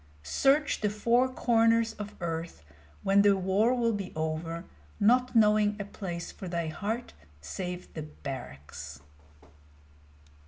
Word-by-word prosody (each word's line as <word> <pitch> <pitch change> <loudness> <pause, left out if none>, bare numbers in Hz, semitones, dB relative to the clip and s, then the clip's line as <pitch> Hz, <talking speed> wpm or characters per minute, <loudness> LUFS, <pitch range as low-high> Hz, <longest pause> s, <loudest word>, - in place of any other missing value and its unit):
Search 275 - +2
the 210 - +2
four 235 +5 +2
corners 230 -2 +3
of 210 0 -7
earth 165 - -4 0.4
when 195 +1 +5
the 200 -1 +5
war 195 +6 +2
will 235 -2 +1
be 200 -3 -4
over, 160 +1 -3 0.3
not 250 +4 +3
knowing 210 -1 +4
a 200 - -3
place 175 -4 -6
for 190 - -8
thy 170 -2 -2
heart 220 +8 -4 0.3
save 180 - -6
the 160 - -5
barracks! 75 - -8
200 Hz, 125 wpm, -29 LUFS, 165-225 Hz, 0.4 s, when